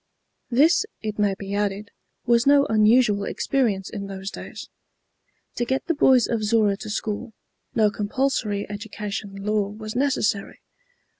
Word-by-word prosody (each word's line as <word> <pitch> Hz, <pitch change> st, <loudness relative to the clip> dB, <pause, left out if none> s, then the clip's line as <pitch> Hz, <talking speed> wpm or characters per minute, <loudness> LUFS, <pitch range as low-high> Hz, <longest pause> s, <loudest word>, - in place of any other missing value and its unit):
This, 295 Hz, -, +4 dB, 0.2 s
it 215 Hz, -1 st, -4 dB
may 205 Hz, -2 st, +2 dB
be 200 Hz, 0 st, -6 dB
added, 205 Hz, 0 st, -2 dB, 0.3 s
was 235 Hz, +1 st, +3 dB
no 285 Hz, 0 st, +6 dB
unusual 215 Hz, -2 st, +4 dB
experience 215 Hz, -9 st, 0 dB
in 200 Hz, -3 st, -6 dB
those 195 Hz, 0 st, -6 dB
days. -, -, -8 dB, 0.9 s
To -, -, +1 dB
get 260 Hz, +3 st, -1 dB
the 335 Hz, -, +1 dB
boys 260 Hz, -5 st, +5 dB
of 225 Hz, -2 st, -1 dB
Zorra 210 Hz, -2 st, +3 dB
to 215 Hz, -, -8 dB
school, 220 Hz, +2 st, -3 dB, 0.4 s
no 215 Hz, -2 st, +4 dB
compulsory 210 Hz, -1 st, -1 dB
education 205 Hz, -1 st, -6 dB
law 205 Hz, +1 st, 0 dB
was 215 Hz, +1 st, -8 dB
necessary. 245 Hz, -6 st, 0 dB
215 Hz, 140 wpm, -24 LUFS, 205-240 Hz, 0.9 s, no